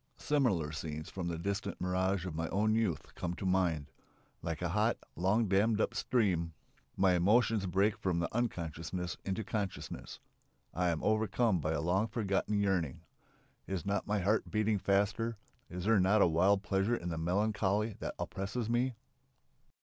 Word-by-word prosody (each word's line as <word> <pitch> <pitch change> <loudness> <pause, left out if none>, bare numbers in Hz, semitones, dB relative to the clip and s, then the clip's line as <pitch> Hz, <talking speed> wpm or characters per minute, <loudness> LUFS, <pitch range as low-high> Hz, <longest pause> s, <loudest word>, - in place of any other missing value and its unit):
Similar 115 - +1
scenes 75 0 -5
from 90 -3 -4
the 85 -1 -2
distant 100 +3 -3
mirage 95 0 0
of 90 - -4
my 80 +1 -2
own 105 +2 +2
youth 110 -9 -1
come 90 0 -3
to 95 - -6
mind. 90 -6 +1 0.5
Like 80 +1 -4
a 90 - 0
hot, 105 +6 +2 0.2
long 100 +6 +2
dammed 105 +3 +3
up - - +1
stream 90 -9 +1 0.4
my 95 -1 +4
emotions 105 +3 +3
break 100 +3 +2
from 95 -5 0
the 85 - 0
unconsciousness 90 -5 -3
into 95 +3 -2
consciousness. 100 -2 -4 0.5
I 90 0 +1
am 80 -2 -1
overcome 110 -1 +2
by 80 +1 -1
a 75 - -1
long 95 +7 +1
forgotten 105 -2 0
yearning. 95 -8 0 0.7
Is 95 -4 -3
not 100 0 -1
my 105 +1 +1
heart 100 +3 +1
beating 110 -1 +1
faster? 100 +4 +1 0.3
Is 90 +1 -5
there 110 -1 +4
not 100 +3 +4
a - - +5
wild 95 +5 +3
pleasure 100 +3 +1
in 90 -6 -4
the 80 -1 -3
melancholy 105 +4 +1
that - - -4
oppresses 105 +4 -3
me? 125 +1 +1
95 Hz, 165 wpm, -33 LUFS, 85-110 Hz, 0.7 s, a